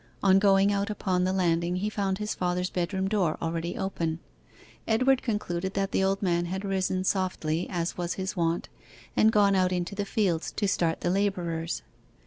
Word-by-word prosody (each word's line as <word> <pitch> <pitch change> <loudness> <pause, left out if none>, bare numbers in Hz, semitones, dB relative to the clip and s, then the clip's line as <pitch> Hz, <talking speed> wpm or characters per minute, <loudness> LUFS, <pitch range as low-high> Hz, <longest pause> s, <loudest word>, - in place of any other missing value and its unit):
On 195 -1 +6
going 195 0 +4
out 200 +1 -1
upon 185 -3 0
the 185 - +1
landing 175 -2 +1
he 190 +3 -1
found 195 -3 -1
his 210 +1 -2
father's 180 0 -1
bedroom 190 +2 -1
door 195 -6 +1
already 165 +1 -3
open. 165 -4 -2 0.7
Edward 255 +4 +3
concluded 190 -5 -2
that 195 0 0
the - - +1
old 195 +1 0
man 175 -2 +1
had 190 +3 -4
risen 185 -1 0
softly, 180 -4 -1
as 175 -2 -2
was 175 0 -2
his 190 +1 -3
wont, 170 -1 0 0.5
and 220 - +5
gone 205 -2 +4
out 185 -1 +2
into 180 +1 -2
the 205 0 -2
fields 185 -6 0
to 205 - 0
start 170 -3 0
the 175 - +1
labourers. 175 -4 -1
190 Hz, 180 wpm, -27 LUFS, 175-200 Hz, 0.7 s, On